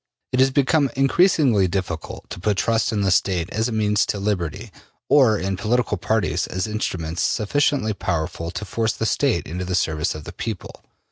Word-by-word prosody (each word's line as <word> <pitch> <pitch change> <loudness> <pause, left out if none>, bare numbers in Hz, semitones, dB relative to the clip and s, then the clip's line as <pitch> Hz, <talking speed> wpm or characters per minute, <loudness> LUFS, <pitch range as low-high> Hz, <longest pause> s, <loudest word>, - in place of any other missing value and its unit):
It 125 - 0
has 130 +1 +5
become 140 +1 +2
increasingly 135 - +3
difficult 90 -3 -4
to - - -6
put 105 +2 0
trust 115 +2 +1
in 105 -2 -1
the 95 -1 +2
State 90 -2 +1
as 110 +2 0
a - - -4
means 105 -2 +2
to - - -1
liberty, 100 +1 -3 0.4
or 125 -7 +5
in 95 0 -2
political 110 +2 0
parties 95 -5 0
as 95 +2 -2
instruments 90 -6 -3
sufficiently 115 0 +1
powerful 85 -3 -3
to 90 +5 -5
force 110 +3 -1
the 110 - -3
State 110 - +1
into 90 +3 -4
the 90 0 -2
service 80 -3 0
of 75 - -8
the - - -9
people. 110 -5 -6
105 Hz, 185 wpm, -22 LUFS, 90-115 Hz, 0.4 s, has